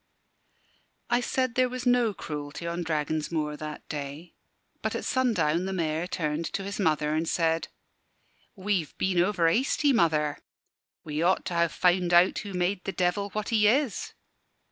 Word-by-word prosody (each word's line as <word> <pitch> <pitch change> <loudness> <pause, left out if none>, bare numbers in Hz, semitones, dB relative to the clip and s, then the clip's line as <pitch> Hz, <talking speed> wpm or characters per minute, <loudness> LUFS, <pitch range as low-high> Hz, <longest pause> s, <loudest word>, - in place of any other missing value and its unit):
I 240 +1 +3
said 255 0 0
there 255 0 +2
was 255 0 -5
no 245 -2 +3
cruelty 150 -3 -6
on 170 +1 -2
Dragon's 155 -1 -1
Moor 150 -2 -1
that 150 0 -7
day. 145 +3 -6 0.5
But - - -2
at - - -4
sundown 210 - +1
the 190 - -3
Mayor 165 -1 -1
turned 155 -2 -2
to 195 - -2
his 200 +2 -5
mother 155 -5 +1
and 160 +1 0
said 165 -2 +1 0.9
"We've 190 -5 -2
been 185 -2 +1
over 180 -3 +2
hasty, 270 - +2
mother. 155 - +2 0.6
We 150 0 -3
ought 180 +3 +2
to 175 - -3
ha' 170 0 +3
found 180 0 +2
out 175 +2 +5
who 205 -2 -7
made 180 +1 0
the 195 - -3
Devil 185 +2 0
what 215 0 -3
he 215 -2 +4
is." 250 -1 +1
175 Hz, 165 wpm, -27 LUFS, 155-205 Hz, 0.9 s, out